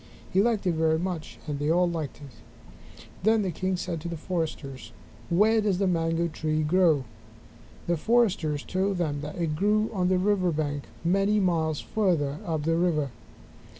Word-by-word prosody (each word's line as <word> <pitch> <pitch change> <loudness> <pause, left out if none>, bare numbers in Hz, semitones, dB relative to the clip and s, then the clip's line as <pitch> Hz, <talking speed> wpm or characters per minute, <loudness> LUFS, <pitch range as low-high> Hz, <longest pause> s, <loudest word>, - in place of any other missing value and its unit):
He 190 - +5
liked 220 -2 +1
it 180 - +3
very 160 0 +2
much, 175 -2 -4
and 145 -2 -3
they 145 +1 0
all 175 +2 +3
liked 160 -4 -4
it. 125 - -17 0.2
Then 220 +2 +3
the 185 - -1
king 185 +3 -1
said 175 -3 -4
to 170 - -5
the 170 - -4
foresters, 155 -6 -4 0.4
"Where 215 +5 +4
does 205 -3 +1
the 195 - +1
mango 165 -1 +1
tree 155 -1 -1
grow?" 160 -3 +3 0.8
The 170 0 +1
foresters 185 -8 +1
told 190 +1 -1
him 150 -5 -1
that 150 +1 -6
it 165 -3 -1
grew 210 +5 +2
on 185 -3 +1
the 185 0 +3
river 185 -1 +2
bank 145 -2 -2 0.2
many 195 +4 +2
miles 160 -5 +1
farther 160 -9 0
up 160 -3 -1
the 165 +1 +1
river. 155 -6 +1
170 Hz, 175 wpm, -27 LUFS, 155-190 Hz, 0.8 s, He